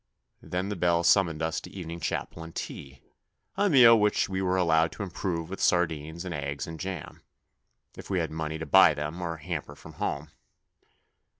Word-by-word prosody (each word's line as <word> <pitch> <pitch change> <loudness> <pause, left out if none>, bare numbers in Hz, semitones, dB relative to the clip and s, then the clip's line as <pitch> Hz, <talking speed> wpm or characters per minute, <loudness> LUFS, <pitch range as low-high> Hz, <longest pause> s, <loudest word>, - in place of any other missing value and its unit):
Then 90 +2 -3
the 105 - -2
bell 85 -1 +2
summoned 85 -3 +3
us 80 +1 -1
to - - -10
evening 85 -3 -7
chapel 80 - -3
and 80 0 -11
tea 70 -1 -7 0.5
a 205 +1 +2
meal 120 -7 +8
which 105 0 +2
we 95 0 -2
were 95 0 +1
allowed 80 -2 +3
to - - -5
improve 85 -3 -3
with 95 +3 -7
sardines 80 -1 0
and 90 - -4
eggs 70 -2 -4
and 80 -1 -8
jam, 95 -4 -6 0.7
if - - -11
we 95 - 0
had 80 -3 -1
money 80 0 -3
to 80 - -5
buy 70 - +6
them 75 +4 -4
or 85 -1 -3
a 80 - -14
hamper 80 -4 -5
from - - -13
home. - - -3
85 Hz, 190 wpm, -28 LUFS, 80-95 Hz, 0.7 s, meal